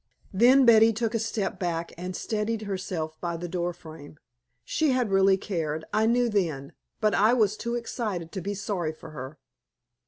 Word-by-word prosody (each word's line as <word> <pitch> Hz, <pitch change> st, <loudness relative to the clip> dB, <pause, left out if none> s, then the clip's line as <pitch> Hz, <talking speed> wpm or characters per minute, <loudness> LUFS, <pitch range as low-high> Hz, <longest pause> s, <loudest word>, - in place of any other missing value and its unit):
Then 250 Hz, +7 st, +6 dB
Betty 225 Hz, -1 st, +7 dB
took 225 Hz, +1 st, -2 dB
a 230 Hz, -, +1 dB
step 210 Hz, -4 st, -2 dB
back 170 Hz, -2 st, -3 dB
and 180 Hz, +2 st, -6 dB
steadied 215 Hz, 0 st, -2 dB
herself 180 Hz, -5 st, -4 dB
by 170 Hz, -1 st, -2 dB
the 175 Hz, +1 st, -5 dB
door 175 Hz, 0 st, -2 dB
frame. 155 Hz, -3 st, -12 dB, 0.5 s
She 310 Hz, -4 st, +1 dB
had 245 Hz, -5 st, 0 dB
really 195 Hz, 0 st, +4 dB
cared, 160 Hz, -6 st, -3 dB
I 215 Hz, +1 st, +3 dB
knew 240 Hz, +1 st, +3 dB
then, 165 Hz, -11 st, -1 dB, 0.3 s
but 215 Hz, -1 st, +2 dB
I 215 Hz, +5 st, +4 dB
was 215 Hz, -4 st, +2 dB
too 235 Hz, +2 st, -3 dB
excited 210 Hz, -8 st, -4 dB
to 190 Hz, -, -5 dB
be 200 Hz, +4 st, -3 dB
sorry 185 Hz, -5 st, -2 dB
for 160 Hz, 0 st, -12 dB
her. 140 Hz, 0 st, -8 dB
195 Hz, 180 wpm, -27 LUFS, 170-225 Hz, 0.5 s, Betty